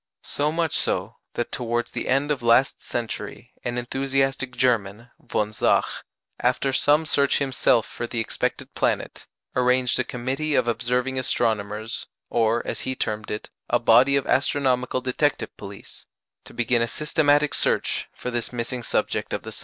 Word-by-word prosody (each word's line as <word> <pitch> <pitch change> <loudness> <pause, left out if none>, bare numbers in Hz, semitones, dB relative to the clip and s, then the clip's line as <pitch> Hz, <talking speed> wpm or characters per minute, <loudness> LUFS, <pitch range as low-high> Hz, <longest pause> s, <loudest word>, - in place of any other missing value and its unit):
So 145 +1 0
much 165 -2 0
so, - - -1 0.2
that 120 - -2
towards 120 -1 -2
the - - -4
end 135 +3 +2
of 140 - -1
last 120 +3 +3
century 115 -2 -5
an 120 0 -2
enthusiastic 135 +1 -1
German, 115 -2 0
von 105 -3 -2
Zach, 105 - +3 0.5
after 135 -1 +1
some 150 +3 +3
search 140 -2 +3
himself 130 -4 +2
for 120 - -5
the 115 - -2
expected 115 - -2
planet, - - -1 0.3
arranged 125 -1 +2
a - - +3
committee 135 +5 -2
of - - +2
observing 125 +2 0
astronomers, 110 -3 -1 0.2
or, 115 0 +2
as - - -3
he 130 - -2
termed 110 -3 -3
it, 105 - -5 0.2
a - - +4
body 135 +3 +5
of 140 - +1
astronomical 130 -2 +1
detective 130 +3 0
police, 100 -1 -11 0.4
to - - -13
begin 120 0 +2
a 115 - +2
systematic 150 +1 +2
search - - 0
for 125 - -6
this 120 -1 -2
missing 120 +1 -3
subject - - -1
of - - -2
the - - -7
sun. - - -8
125 Hz, 160 wpm, -24 LUFS, 115-135 Hz, 0.5 s, body